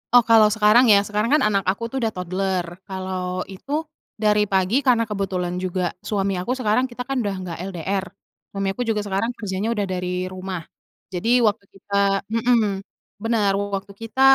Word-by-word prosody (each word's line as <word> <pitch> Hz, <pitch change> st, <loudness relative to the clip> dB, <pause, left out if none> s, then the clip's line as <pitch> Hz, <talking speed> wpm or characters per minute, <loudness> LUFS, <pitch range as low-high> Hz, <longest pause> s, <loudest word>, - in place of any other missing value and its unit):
Oh 245 Hz, -, +8 dB
kalo 225 Hz, -1 st, +6 dB
sekarang 215 Hz, +4 st, +6 dB
ya 200 Hz, -2 st, +6 dB
sekarang 210 Hz, +3 st, -1 dB
kan -, -, +3 dB
anak 200 Hz, -2 st, +2 dB
aku 195 Hz, +5 st, 0 dB
tuh 270 Hz, -, -3 dB
udah 225 Hz, -2 st, 0 dB
toddler 185 Hz, 0 st, -1 dB, 0.2 s
kalo 185 Hz, -1 st, -3 dB
itu, 275 Hz, +10 st, -7 dB, 0.5 s
dari 210 Hz, 0 st, +3 dB
pagi 190 Hz, +6 st, +2 dB
karena 250 Hz, -4 st, +3 dB
kebetulan 185 Hz, -4 st, -2 dB
juga 180 Hz, -1 st, -1 dB
suami 195 Hz, -2 st, -1 dB
aku 240 Hz, +8 st, -1 dB
sekarang 250 Hz, +2 st, +2 dB
kita 250 Hz, 0 st, -6 dB
kan 270 Hz, +1 st, -2 dB
udah 205 Hz, -4 st, -1 dB
nggak 170 Hz, -2 st, -5 dB
LDR, 190 Hz, +2 st, -2 dB, 0.4 s
suami 195 Hz, -1 st, -3 dB
aku 245 Hz, -, -5 dB
juga 210 Hz, -2 st, 0 dB
sekarang 205 Hz, +5 st, -1 dB
kerjanya 200 Hz, 0 st, -3 dB
udah 205 Hz, -, 0 dB
dari 180 Hz, 0 st, -3 dB, 0.2 s
rumah, 185 Hz, -2 st, -5 dB, 0.5 s
jadi 235 Hz, +7 st, +2 dB
waktu 205 Hz, -1 st, -1 dB
kita 200 Hz, +1 st, -13 dB, 0.4 s
mhm, 235 Hz, +1 st, +3 dB, 0.6 s
bener 220 Hz, -3 st, +2 dB, 0.2 s
waktu 200 Hz, +1 st, -6 dB
kita 230 Hz, +4 st, -3 dB
200 Hz, 170 wpm, -22 LUFS, 190-230 Hz, 0.6 s, Oh